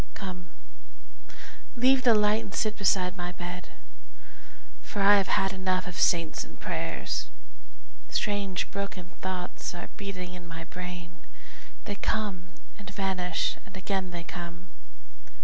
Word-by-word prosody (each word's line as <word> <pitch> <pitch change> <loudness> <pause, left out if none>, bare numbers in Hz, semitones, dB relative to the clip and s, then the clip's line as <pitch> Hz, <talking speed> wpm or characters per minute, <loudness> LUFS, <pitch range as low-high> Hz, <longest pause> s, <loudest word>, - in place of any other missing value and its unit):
Come, 180 -3 -5 1.3
leave 260 +2 +6
the 240 -3 +7
light 210 +1 +5
and 195 - -7
sit 215 0 +2
beside 190 -2 +3
my 175 -1 -3
bed, 180 +1 -6 1.1
For 205 - -5
I 200 +1 +8
have 195 - +3
had 195 0 +3
enough 185 -1 +1
of 180 - -5
saints 170 -2 +3
and - - -14
prayers. - - -2 0.8
Strange 200 -3 0
broken 190 -3 -4
thoughts 185 -1 -3
are 175 - -6
beating 185 -3 -4
in 175 -1 -8
my 165 -1 -6
brain, 175 0 -6 0.7
They 205 - -2
come 200 -6 -1 0.3
and 205 - -8
vanish 185 -3 0
and 195 -1 -10
again 190 -1 -1
they 175 -1 -5
come. 170 +1 -7
185 Hz, 130 wpm, -29 LUFS, 175-200 Hz, 1.3 s, I